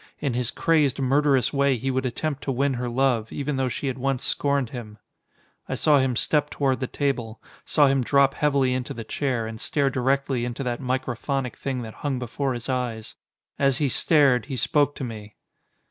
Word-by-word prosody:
In 140 -4 -1
his 120 -1 -1
crazed, 150 -5 +2
murderous 135 -1 +2
way 140 -2 +2
he 135 +4 -2
would 130 0 0
attempt 145 +4 -3
to 135 - 0
win 135 +2 +1
her 125 0 -3
love, 120 -3 +1
even 145 -1 -2
though 130 -1 0
she 125 - -4
had 130 -1 -2
once 135 0 -1
scorned 140 -4 0
him. 110 -4 -8 0.7
I - - -1
saw 150 -2 +4
him 130 -2 +1
step 150 +4 +1
toward 135 -2 0
the 130 - -2
table. 120 -6 -2 0.3
Saw 150 - +4
him 135 -1 +2
drop 140 +2 +3
heavily 140 -3 +2
into 125 -1 -3
the 115 - -5
chair, 125 0 -2
and 110 0 -7
stare 140 -2 +1
directly 135 0 0
into 120 +2 -3
that 120 0 -3
microphonic 130 0 -2
thing 130 -3 -3
that 110 -1 -8
hung 140 -3 -1
before 125 +2 -2
his 120 - -6
eyes. 120 -4 -3 0.5
As 135 -1 +3
he 145 -3 +1
stared, 135 -4 +3
he 135 - -4
spoke 145 +2 +1
to - - -6
me. 110 -4 -7
130 Hz, 195 wpm, -24 LUFS, 125-140 Hz, 0.7 s, saw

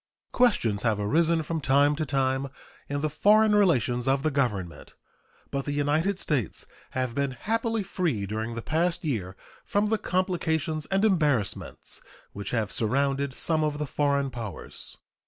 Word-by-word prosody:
Questions 120 - +2
have 110 -3 +1
arisen 160 +10 +2
from 160 0 -3
time 140 +2 +4
to 155 0 -2
time 135 -1 0 0.4
in 145 0 -2
the 155 - +1
foreign 215 +5 +4
relations 130 - +2
of 135 +1 +2
the 155 - +1
Government, 105 -11 -2 0.6
but 140 -1 -2
the 145 - -2
United 155 +7 +1
States 145 - -2 0.3
have 130 -2 -1
been 140 +1 0
happily 225 0 0
free 165 - -1
during 110 +3 -4
the 115 - -5
past 170 +2 0
year 95 - -2 0.3
from 205 +1 0
the 220 -1 +1
complications 160 -5 -1
and 195 +2 +2
embarrassments 150 - 0 0.3
which 100 0 -5
have 110 -3 -1
surrounded 135 +4 +1
some 160 -2 +2
of 150 -1 -1
the 150 - -2
foreign 140 -1 0
powers. 115 -6 -7
145 Hz, 155 wpm, -27 LUFS, 125-170 Hz, 0.6 s, time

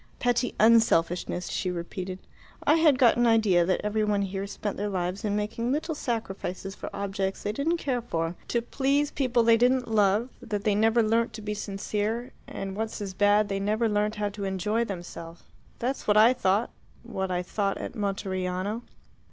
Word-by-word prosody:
"Petty 245 0 0
unselfishness," 180 -6 +3
she 185 - -2
repeated. 180 +1 -5 0.5
"I 295 - +4
had 310 -5 +5
got 245 -3 +5
an 240 0 +3
idea 210 -7 +4
that 185 - +1
every 210 +1 0
one 205 -1 +1
here 195 0 -3
spent 205 0 -4
their 205 +1 -2
lives 185 +1 -2
in 205 -1 0
making 215 +3 -2
little 310 +3 -1
sacrifices 195 -8 -4
for - - -7
objects 195 -1 -3
they 205 - -1
didn't 305 +10 0
care 260 -6 -1
for, 165 -6 -2
to 235 -1 0
please 280 +4 +1
people 250 -4 +1
they 230 0 +5
didn't 250 +2 +2
love; 210 +2 +2
that 205 -1 -3
they 210 - +2
never 225 +3 +3
learnt 230 +2 +1
to 215 - -8
be 210 0 -2
sincere 210 +4 -3 0.2
and, 195 0 -5
what's 220 +1 -3
as 200 -2 -5
bad, 205 +1 +3
never 210 +4 +1
learnt 210 0 0
how 210 -1 -1
to 200 0 -7
enjoy 195 +4 0
themselves. 175 -4 -7 0.3
That's 260 +3 -3
what 210 0 +4
I 225 +4 +7
thought 205 -1 +1 0.3
what 190 -5 -3
I 180 0 -1
thought 195 +2 -1
at - - -6
Monteriano." 195 0 -2
210 Hz, 180 wpm, -27 LUFS, 195-230 Hz, 0.5 s, I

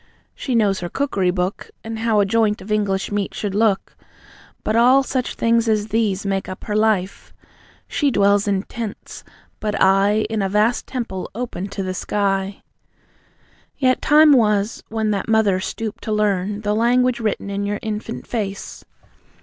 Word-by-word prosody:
She 255 - -3
knows 205 -4 +2
her 175 - -5
cookery 200 -9 0
book, 180 +1 -2
And 225 0 -5
how 225 -2 +2
a 200 - +4
joint 215 0 +1
of 210 - -9
English 200 -2 0
meat 205 -1 -2
should 205 -2 -3
look. 210 -1 +1 0.7
But 215 - 0
all 255 +4 +5
such 260 -2 -2
things 230 0 +2
as 215 0 0
these 210 -3 0
Make 195 -1 -2
up 185 - -8
her 210 - -3
life. 210 -3 0 0.5
She 290 -3 +1
dwells 205 -3 +3
in 195 -1 +1
tents, 225 -3 -7 0.4
but 210 -1 -2
I 200 +3 +4
In 220 -1 -2
a 195 - 0
vast 210 +4 +1
temple 230 -8 -4
open 230 -6 -4
to 195 -1 -5
the 185 0 -3
sky." 195 0 -1 1.1
Yet, 255 -2 +2
time 305 +1 +6
was, 210 -3 +2
when 220 -1 -1
that 200 +1 -2
Mother 215 -4 +3
stooped 215 +3 -5
to 220 - -3
learn 205 -1 0
The 210 -1 0
language 245 +2 +2
written 215 -2 -2
in 200 0 -2
your 205 0 -1
infant 220 +1 -5
face. 200 -4 -5
210 Hz, 165 wpm, -21 LUFS, 195-225 Hz, 1.1 s, time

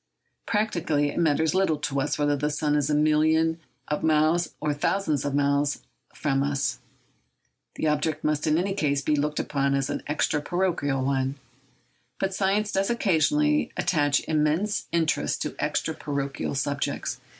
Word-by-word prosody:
Practically, 170 -9 0
it - - -3
matters 160 -1 +2
little 185 -5 +2
to 140 -1 -2
us 145 - -1
whether 145 0 +2
the 150 +1 -1
sun 150 0 0
is 145 -1 +1
a 150 - +2
million 155 +2 +3 0.3
of 150 - -2
miles 160 +2 +2
or 150 -1 0
a - - 0
thousand 175 +5 0
millions 145 -1 -1
of 140 -1 -1
miles 140 0 +1 0.3
from 135 -2 0
us. 140 0 -1 1.0
The - - -6
subject 155 0 0
must 150 0 0
in 155 0 +3
any 190 +3 0
case 145 -6 0
be 150 - +2
looked 150 +1 -1
upon 140 -1 0
as 135 0 -1
an - - -3
extra 150 0 0
parochial 150 -7 0
one. 135 0 0 0.8
But 195 0 -1
science 200 +2 +1
does 195 +1 0
occasionally 295 - +2
attach 145 -4 +1
immense 155 +7 0
interest 165 -2 0
to - - -5
extra - - -1
parochial 140 -1 -3
subjects. 140 +1 -2
150 Hz, 160 wpm, -26 LUFS, 145-170 Hz, 1.0 s, million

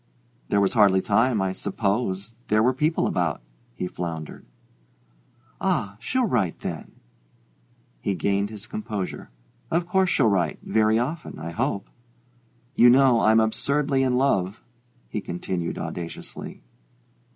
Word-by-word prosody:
"There 100 - +3
was 100 -1 +2
hardly 100 -4 +5
time, 110 +2 +2
I 95 -1 -1
suppose 100 +1 -2
there 110 +1 +3
were 125 +2 +3
people 155 +5 +1
about 85 -5 0 0.2
" - - -36
he 90 - -3
floundered. 85 -3 -6 1.1
"Ah, 100 0 0
she'll 255 - 0
write, 110 - 0
then." - - -6 1.1
He - - -3
regained 100 +1 0
his 105 -2 -8
composure. 105 -4 -5 0.4
"Of 170 +1 +1
course 190 +1 +2
she'll 135 - +3
write: 90 -6 +1
very 110 0 +2
often, 150 +7 -3
I 80 +2 -6
hope. 100 +4 -2 0.9
You 120 - +7
know 130 -1 +6
I'm 110 0 +5
absurdly 135 +6 +1
in 130 -1 +2
love," 105 -7 +1 0.4
he 105 - -4
cried 85 -1 -3
audaciously. 85 -1 -7
110 Hz, 130 wpm, -25 LUFS, 95-125 Hz, 1.1 s, You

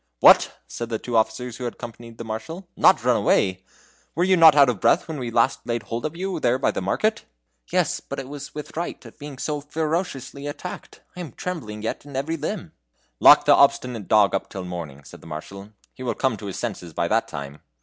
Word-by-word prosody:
"What!" - - +6
said 120 -1 -6
the 115 - -1
two 120 +2 -5
officers 115 +2 0
who 125 - -5
had 120 - -3
accompanied 115 0 -10
the - - -6
Marshal 160 - -6
"not 190 - +5
run 125 -1 +3
away? 95 -2 +2 0.5
Were 170 - +2
you 190 +1 +4
not 165 -4 +8
out 140 -2 +7
of 120 -6 -1
breath - - +3
when 155 -4 -5
at 120 - -4
last 115 0 +3
we 120 - -2
laid 115 -2 -3
hold 115 +5 -3
of 155 - -10
you 185 -1 -3
there 125 -3 +2
by 135 - +1
the - - -4
market?" 215 - 0 0.5
"Yes, - - +1
but - - -8
it 135 - -5
was 145 0 -9
with 150 - -6
fright 170 +2 -5
at - - -14
being 145 -2 -8
so 150 +2 -3
ferociously 150 -2 -3
attacked. 160 +5 -8
I - - -9
am 165 -9 -7
trembling 110 -13 -5
yet 110 - -3
in 140 -1 -11
every 145 +5 -1
limb." 165 - -4 0.5
"Lock - - +8
the - - +7
obstinate 120 -5 +2
dog 105 -3 +4
up 95 - -2
till 95 - -6
the - - -7
morning," 75 -5 -7
said - - -13
the - - -13
Marshal; 95 +6 -8 0.2
"he - - -14
will 125 - -2
come 130 -4 0
to 100 - -8
his 95 - -5
senses 95 -8 -5
by 85 - 0
that 115 +5 +1
time!" 70 -1 -8
120 Hz, 230 wpm, -23 LUFS, 105-150 Hz, 0.5 s, not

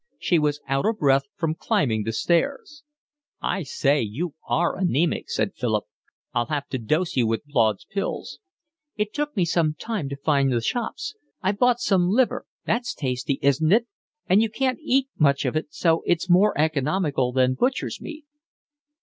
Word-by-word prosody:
She 175 - +2
was 150 -1 0
out 135 +6 +1
of 220 -1 0
breath 135 -6 +3
from 160 -2 -1
climbing 115 -8 0
the 115 - -1
stairs. 275 - 0 0.6
"I 195 - -1
say, 140 -1 +1
you 135 +10 -3 0.2
are 175 +1 +1
anaemic," 175 -3 0
said 110 -2 -1
Philip. 110 -4 -1 0.5
"I'll 120 -1 0
have 145 0 -2
to 130 - -3
dose 155 +10 0
you 120 -4 +2
with 115 +5 -1
Blaud's 115 -8 +1
Pills." 195 0 -4 0.6
"It 210 0 -2
took 295 -4 -3
me 180 - +3
some 160 -2 +1
time 205 -5 -4
to 140 - -4
find 140 -1 +1
the 120 - +2
shops. 235 - -3 0.3
I 190 - +3
bought 240 +4 +2
some 180 -5 +2
liver. 245 +5 +1 0.2
That's 240 +2 -1
tasty, 130 0 -2
isn't 145 +4 +3
it? 230 +3 +4 0.4
And 190 +4 +4
you 225 - +1
can't 260 +5 -1
eat 270 -3 +2
much 140 -2 +3
of - - -1
it, 155 -1 -2
so 165 -1 +2
it's 175 +1 +1
more 185 +4 +4
economical 150 -3 +1
than 130 0 +2
butcher's 250 - -1
meat." 310 -2 -8
155 Hz, 175 wpm, -24 LUFS, 135-205 Hz, 0.6 s, it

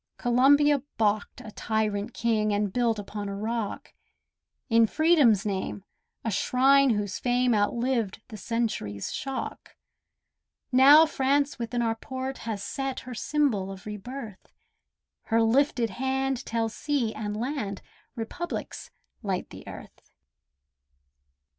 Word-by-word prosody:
Columbia 280 +3 +4 0.2
baulked 215 +2 0
a 220 -4 -9
tyrant 215 0 -1
king, 220 -2 +1
And 205 -1 0
built 235 -3 +1
upon 205 0 -5
a 200 - -4
rock, 220 +1 -4 0.7
In 230 -2 +4
Freedom's 290 - +4
name, 195 -1 -3 0.4
a 225 - 0
shrine 270 +6 +4
whose 205 -1 -3
fame 245 0 +2
Outlived 225 0 0
the 220 - -8
century's 215 - -3
shock. 270 -1 -5 1.0
Now 280 +5 +8
France 280 -1 0
within 235 +1 -2
our 225 -1 +1
port 260 +3 -6
has 205 -3 -3
set 270 -1 -3
Her 255 - -8
symbol 235 -8 0
of 190 -1 -10
re 210 0 -5
birth; 225 -2 -9 0.7
Her 225 0 +2
lifted 240 -1 +2
hand 265 +3 -2
tells 225 -1 -1
sea 275 -7 -1
and 210 -1 -4
land 225 -5 -3 0.3
Republics 270 +10 -5 0.3
light 195 -5 -3
the - - -11
earth. - - -11
230 Hz, 120 wpm, -27 LUFS, 210-265 Hz, 1.0 s, Now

